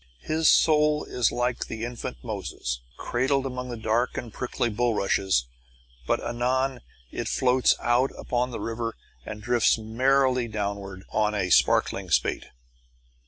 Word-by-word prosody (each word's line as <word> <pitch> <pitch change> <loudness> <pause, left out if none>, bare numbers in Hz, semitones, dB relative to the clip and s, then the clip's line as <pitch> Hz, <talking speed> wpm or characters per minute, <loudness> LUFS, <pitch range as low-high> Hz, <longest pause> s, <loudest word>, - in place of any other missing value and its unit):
His 160 0 +2
soul 150 -1 +4
is 125 -2 0
like 125 0 -1
the 110 +1 -4
infant 120 - -6
Moses, 60 0 -4 0.2
cradled 135 +3 0
among 125 -2 -5
dark 115 +3 0
and 115 -4 -6
prickly 125 -1 -2
bullrushes; 105 - +1 0.6
but - - +2
anon 130 +1 -1 0.3
it - - -4
floats 130 0 +3
out 120 +3 +2
upon 125 0 -1
the 120 - -6
river 115 0 -3 0.3
and 105 - -7
drifts 120 0 +3
merrily 125 +3 +2
downward 100 -3 -4
on 105 0 +1
a 95 -3 -1
sparkling - - +3
spate. - - +1
120 Hz, 130 wpm, -26 LUFS, 110-130 Hz, 0.6 s, soul